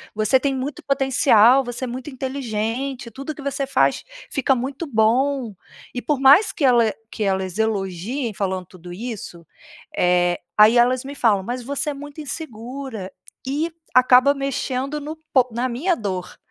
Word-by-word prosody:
você 215 +5 +3
tem 275 0 -1
muito 265 +3 -4
potencial, 270 -2 +4
você 245 +1 -6
é - - -5
muito 255 +4 -6
inteligente, 260 -1 -4
tudo 275 +3 -6
que 285 - -10
você 275 -1 -2
faz - - +2 0.3
fica 270 -1 +2
muito 270 +6 -4
bom." 245 +1 +1 0.4
E 245 - -4
por 295 0 -1
mais 280 +10 +6
que 290 - -1
ela 235 -3 +4 0.2
que 220 - -8
elas 190 0 -1
elogiem 215 +3 -2
falando 190 -2 -3
tudo 180 0 -13
isso, 190 -4 -7 0.5
eh, 175 -1 +2 0.2
aí 215 +3 +7
elas 250 +1 +3
me 280 - -6
falam: 210 -7 +2
"Mas 245 +4 -4
você 285 +4 -2
é - - -5
muito 290 +2 -9
insegura." 250 - -7 0.4
E 305 +5 -1 0.2
acaba 255 +2 +6
mexendo 275 +1 -3
no 305 +2 -6 0.2
po 255 -2 +4
na 240 +3 -1
minha 310 +10 0
dor, 185 - -5
255 Hz, 160 wpm, -22 LUFS, 215-275 Hz, 0.5 s, aí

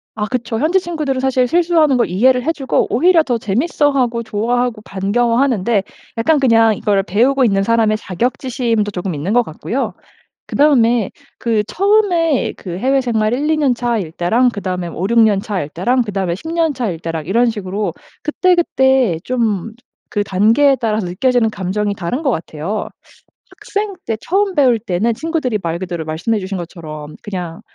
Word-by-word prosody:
아 210 -1 -2
그쵸. 230 -1 -3
현지 330 +7 +2
친구들은 310 -7 -3
사실 260 -1 +2
실수하는 330 -2 +3
걸 240 - +2
이해를 250 +7 +3
해 320 - +1
주고 275 -5 0
오히려 335 +6 +4
더 245 -5 -1
재밌어하고 250 - 0
좋아하고 230 +2 -1
반가워하는데 230 +1 +1 0.3
약간 290 +7 +2
그냥 225 -4 +4
이걸 200 -1 +1
배우고 245 +9 +2
있는 195 -3 +2
사람의 220 0 +2
자격지심도 230 +1 -1
조금 180 -2 -4
있는 160 +8 -2
것 245 0 +4
같고요. 235 - -4 0.5
그다음에 240 -7 +3 0.3
그 225 -3 +1
처음에 355 - +2
그 180 -2 -6
해외생활 240 -3 +1
1-2 300 +4 0
년 285 -5 +2
차일 235 -9 -2
때랑 225 +10 +2
그다음에 185 -5 -4
뭐 - - -8
5-6 230 +5 +3
년 210 -3 +4
차일 195 -8 -3
때랑 245 +11 +1
그다음에 195 -5 -2
10 210 - -9
년 330 -2 +1
차일 215 -10 -3
때랑 165 -2 -5
이런 230 +7 +2
식으로 205 -1 -3 0.3
그때그때 265 - +2
좀 225 -5 -1
저 245 - -30 0.3
그 205 - +2
단계에 225 +9 +3
따라서 220 -5 -1
느껴지는 235 +6 +1
감정이 205 0 -2
다른 195 - -3
것 295 - 0
같아요. 170 +1 -3 0.7
학생 410 -1 -3
때 225 - -1
처음 390 +1 0
배울 260 -7 +4
때는 210 +2 -1
친구들이 300 -4 -2
말 170 -1 -3
그대로 175 -3 -4
말씀해 165 +8 -1
주신 195 0 -4
것처럼 155 -4 -8
그냥 180 -5 -5
230 Hz, 355 characters per minute, -17 LUFS, 195-265 Hz, 0.7 s, 오히려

